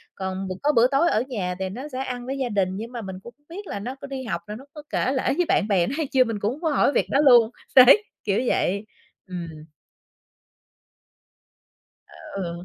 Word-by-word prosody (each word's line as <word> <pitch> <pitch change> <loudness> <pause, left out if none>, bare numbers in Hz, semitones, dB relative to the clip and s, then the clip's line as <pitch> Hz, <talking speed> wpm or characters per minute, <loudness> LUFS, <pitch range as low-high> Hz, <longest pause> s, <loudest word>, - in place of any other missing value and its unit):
Còn 190 0 -4
b - - -5
có 295 - +4
bữa 235 +1 +6
tối 280 +6 +2
ở 220 - +1
nhà 185 -8 -3
thì 190 0 -2
nó 255 +9 -7
sẽ 255 - -5
ăn 250 -2 -5
với 270 +2 -4
gia 260 -3 -2
đình, 195 -3 +1
nhưng 225 +3 -6
mà 240 -2 -5
mình 190 -3 -7
cũng 235 - -11
hổng 290 - -39
biết 390 +4 -8
là - - -4
nó 250 +6 -5
có 280 - -10
đi 270 -1 -5
học 180 -8 -3
là 210 - -6
nó 260 +5 -11
có 300 -2 -10
kể 255 - 0
lể 260 - -1
với 355 - +2
bạn 360 - +2
bè 185 -5 +2
nó - - -3
hay 315 -3 -1
chưa, 260 -1 +5
mình 225 -4 -4
cũng 205 +2 0
hổng 300 - -12
có 325 - +1
hỏi 285 -1 +3
việc - - +2
đó 275 - +2
luôn. 240 -4 +7 0.3
Đấy. 270 +11 +8 0.2
Kiểu 200 +1 +1
vậy. 200 0 0 0.4
Ừm. 180 -2 -5 2.6
À, - - -19 0.2
ừ, 195 - -2
ừ. 170 0 -6
240 Hz, 240 wpm, -24 LUFS, 195-275 Hz, 2.6 s, Đấy